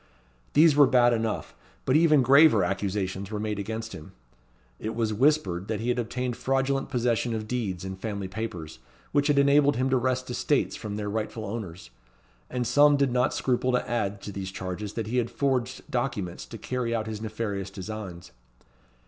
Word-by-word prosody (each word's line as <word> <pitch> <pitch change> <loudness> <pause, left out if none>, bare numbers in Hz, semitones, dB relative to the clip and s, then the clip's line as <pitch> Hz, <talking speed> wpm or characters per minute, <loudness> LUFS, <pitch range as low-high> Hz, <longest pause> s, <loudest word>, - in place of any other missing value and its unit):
These 155 -1 +6
were 145 -2 +7
bad 120 -1 +4
enough, 115 -2 -2 0.3
but 130 - +2
even 155 -4 +5
graver 135 - +6
accusations 95 +1 -2
were 105 -1 -4
made 105 -1 -2
against 110 +2 -4
him. 75 - -10 0.7
It 110 +1 -4
was 110 -2 0
whispered 105 - +2
that 110 - -2
he 115 +2 -2
had 125 0 +1
obtained 120 +1 -2
fraudulent 135 +1 0
possession 120 -2 0
of 110 -1 -4
deeds 100 -7 -3
and 95 0 -6
family 100 -2 -4
papers, 90 -6 -6 0.3
which 145 0 +2
had 145 -2 +2
enabled 140 +1 +5
him 130 +2 0
to 130 - +4
wrest 130 +1 0
estates - - 0
from 105 -1 -5
their 105 0 -3
rightful 110 +1 -3
owners; 95 - -6 0.6
and 125 -1 -2
some 145 +3 +5
did 140 -2 +2
not 125 0 +2
scruple 130 0 +1
to 125 - 0
add 100 -4 -2
to 105 - -6
these 95 -1 -5
charges 95 +2 -5
that 115 - -3
he 120 +4 -2
had 120 -1 +1
forged 130 -2 -1
documents 120 -8 -2
to - - -8
carry 125 -2 -2
out 110 -1 -1
his 110 -1 -5
nefarious 105 -3 -3
designs. 95 -3 -7
115 Hz, 180 wpm, -27 LUFS, 100-130 Hz, 0.7 s, were